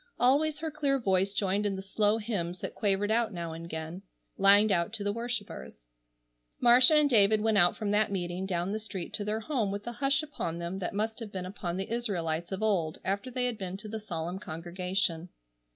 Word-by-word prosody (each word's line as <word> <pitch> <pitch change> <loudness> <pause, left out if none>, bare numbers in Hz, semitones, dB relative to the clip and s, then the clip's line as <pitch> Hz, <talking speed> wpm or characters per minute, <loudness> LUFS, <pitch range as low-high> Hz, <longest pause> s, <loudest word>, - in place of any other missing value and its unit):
Always 290 +5 +3
her 320 +1 -4
clear 285 -2 0
voice 195 -5 +1
joined 200 +1 0
in 205 -2 -1
the 190 - -6
slow 210 +2 +1
hymns 195 -6 -3
that - - -6
quavered 205 0 0
out 230 0 +1
now 170 -3 -5
and 165 +1 -8
again, 160 +2 -6 0.3
lined 200 +2 +6
out 170 +1 +1
to 220 -2 -2
the 205 0 -1
worshippers. 230 -2 -5 0.8
Marcia 250 +5 +8
and 300 -1 +5
David 215 -4 +4
went 215 -1 +2
out 175 -1 +4
from 210 -2 -2
that 210 0 +2
meeting 180 0 -3
down 180 0 -1
the 215 - -2
street 200 -5 -6
to 205 - -2
their 215 +2 -2
home 230 -4 -1
with 200 +1 -4
the 240 - -5
hush 275 +4 0
upon 170 - -4
them 170 +3 -4
that 185 +1 -4
must 220 +2 -2
have 225 -3 -7
been 185 -2 -5
upon 185 -2 -5
the 195 +4 -3
Israelites 175 -8 -2
of 190 +3 -3
old 175 -7 0
after 200 +6 -2
they 250 0 -1
had 245 -3 -2
been 190 -1 -5
to 210 +2 -8
the 220 +1 -5
solemn 175 -3 -5
congregation. 175 0 -2
200 Hz, 215 wpm, -29 LUFS, 180-225 Hz, 0.8 s, Marcia